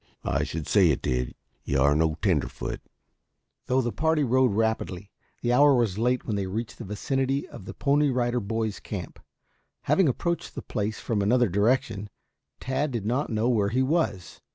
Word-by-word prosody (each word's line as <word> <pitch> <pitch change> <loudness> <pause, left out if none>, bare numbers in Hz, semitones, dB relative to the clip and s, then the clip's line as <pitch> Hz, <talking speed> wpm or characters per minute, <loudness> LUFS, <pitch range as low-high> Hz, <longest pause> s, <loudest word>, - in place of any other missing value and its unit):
"I 70 +1 +1
should 75 +1 -4
say 95 -5 +4
it 75 - 0
did. 60 0 -1 0.3
You 70 - 0
are 70 +2 +4
no 80 0 +2
tenderfoot." - - -1 0.9
Though 130 +1 +3
the 120 -1 -2
party 160 +1 +1
rode 130 -1 +3
rapidly, 100 -3 -1 0.3
the 120 0 +2
hour 140 +2 +6
was 110 -5 +1
late 125 +2 +1
when 110 - -2
they 100 -2 -2
reached 105 +2 -5
the - - -5
vicinity 135 +7 -1
of 95 - -11
the - - -8
Pony 145 +1 +2
Rider 125 -1 0
Boys 110 0 -2
camp. 95 -5 -7 0.6
Having 190 -6 +3
approached 170 +7 -2
the - - -5
place 105 +1 -3
from 110 -3 -1
another 120 +3 +3
direction, 105 +1 +1 0.5
Tad 135 +3 -1
did 115 -6 -4
not 125 +7 0
know 110 +1 0
where 105 -5 +2
he 130 +5 +1
was. 130 - -1
115 Hz, 175 wpm, -26 LUFS, 100-130 Hz, 0.9 s, hour